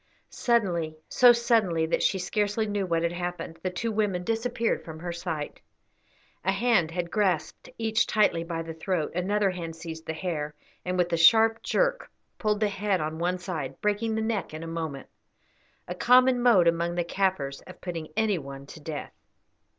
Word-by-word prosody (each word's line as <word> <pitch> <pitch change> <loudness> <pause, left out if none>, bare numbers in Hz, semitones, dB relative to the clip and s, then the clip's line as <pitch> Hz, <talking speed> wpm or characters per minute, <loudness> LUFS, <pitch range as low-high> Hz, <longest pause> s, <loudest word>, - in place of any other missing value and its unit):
Suddenly, 175 -10 0
so 245 -1 +7
suddenly 225 -9 +2
that 160 - 0
she 195 - +2
scarcely 205 +3 0
knew 205 -2 -2
what 165 -1 +1
had 170 - +1
happened, 175 -2 -5
the 185 - -1
two 225 +6 -3
women 205 -4 0
disappeared 230 +2 -1
from 160 -1 -8
her 175 +2 -5
sight. 170 -4 -5 0.8
A 190 - +2
hand 195 -5 +2
had 170 0 -4
grasped 185 -7 0
each 225 +1 +1
tightly 205 -6 +2
by 165 -1 -4
the 165 0 -6
throat, 160 -1 -2
another 195 +3 +1
hand 170 -3 -6
seized 160 -1 -8
the 160 - -2
hair, 155 -3 -3 0.3
and, 180 0 -2
with 175 -1 +1
a - - +3
sharp 225 +7 +6
jerk, - - 0 0.3
pulled 210 -1 0
the 215 - +4
head 200 -1 0
on 155 +1 -3
one 180 +2 0
side, 160 -8 -5
breaking 210 +2 0
the 220 - 0
neck 205 -8 -2
in 160 - -6
a - - -6
moment 160 -4 -5 0.8
a 180 - -3
common 250 +5 +5
mode 215 -8 +5
among 170 +1 +1
the 175 - +1
Kaffirs 170 -7 -1
of 185 - -12
putting 165 -3 -5
any 215 -5 +2
one 140 -1 -9
to 155 - -11
death. 150 0 -6
180 Hz, 180 wpm, -27 LUFS, 165-215 Hz, 0.8 s, so